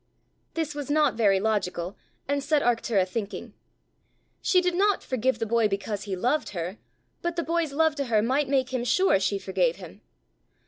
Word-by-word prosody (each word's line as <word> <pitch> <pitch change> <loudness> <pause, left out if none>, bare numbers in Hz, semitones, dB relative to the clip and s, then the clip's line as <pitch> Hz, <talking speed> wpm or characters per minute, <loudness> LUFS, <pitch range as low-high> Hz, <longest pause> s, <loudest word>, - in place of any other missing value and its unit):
This 320 -2 -2
was 290 -2 -6
not 305 +1 +3
very 200 -4 +3
logical, 190 -4 -1 0.3
and 285 0 0
set 295 0 +2
Arctura 230 -5 +1
thinking. 205 +2 -5 0.9
She 365 - +4
did 360 -1 +1
not 400 +2 +2
forgive 255 -1 0
the 230 - -2
boy 230 0 +2
because 205 +1 -3
he 195 -2 -3
loved 250 +11 0
her; 175 +5 -4 0.4
but 345 0 -2
the 340 - -1
boy's 335 -2 0
love 320 +2 +2
to 280 - -1
her 220 -3 +2
might 265 +4 +1
make 265 -2 +1
him 250 -2 0
sure 370 - +3
she 200 +1 0
forgave 480 - 0
him! - - -12
245 Hz, 180 wpm, -26 LUFS, 205-305 Hz, 0.9 s, She